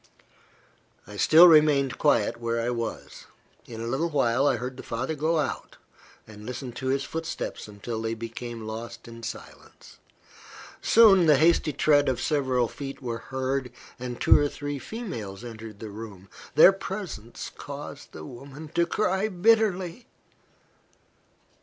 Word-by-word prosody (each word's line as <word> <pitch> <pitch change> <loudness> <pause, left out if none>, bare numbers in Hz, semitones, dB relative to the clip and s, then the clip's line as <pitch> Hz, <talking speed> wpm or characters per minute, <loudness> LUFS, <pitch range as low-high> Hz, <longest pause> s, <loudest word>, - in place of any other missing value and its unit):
I 105 - -11
still 160 - +7
remained 145 -6 +4
quiet 105 - +2
where 115 0 -2
I 115 +1 -1
was. 115 -2 -5 0.4
In 115 -2 -8
a - - -4
little 135 +8 -1
while 135 -2 +2
I - - +3
heard 125 +1 -5
the - - -8
father 130 +6 -3
go 160 +2 0
out, 145 -4 -3 0.5
and 105 -1 -12
listened 125 +1 -6
to 130 - -4
his 135 +1 +1
footsteps 165 -5 -5
until 110 +2 -6
they 115 0 -2
became 115 0 -7
lost 115 +2 -7
in 115 0 -10
silence. - - -10 0.8
Soon 195 -6 +6
the 150 -2 +6
hasty 160 +1 +3
tread 145 0 +3
of 125 -3 -1
several 130 -4 +1
feet 135 +3 -7
were 120 -3 -4
heard, 130 0 -3 0.3
and 125 -1 -6
two - - +6
or 145 0 +1
three 145 -1 -5
females 120 - -7
entered 110 -3 -9
the 110 -2 -7
room. 100 -3 -10 0.3
Their 170 - +9
presence 190 - -6
caused - - -9
the 80 - -9
woman 140 - -10
to 170 +2 +1
cry 195 0 0
bitterly. 210 +1 +1
130 Hz, 145 wpm, -26 LUFS, 115-155 Hz, 0.8 s, Their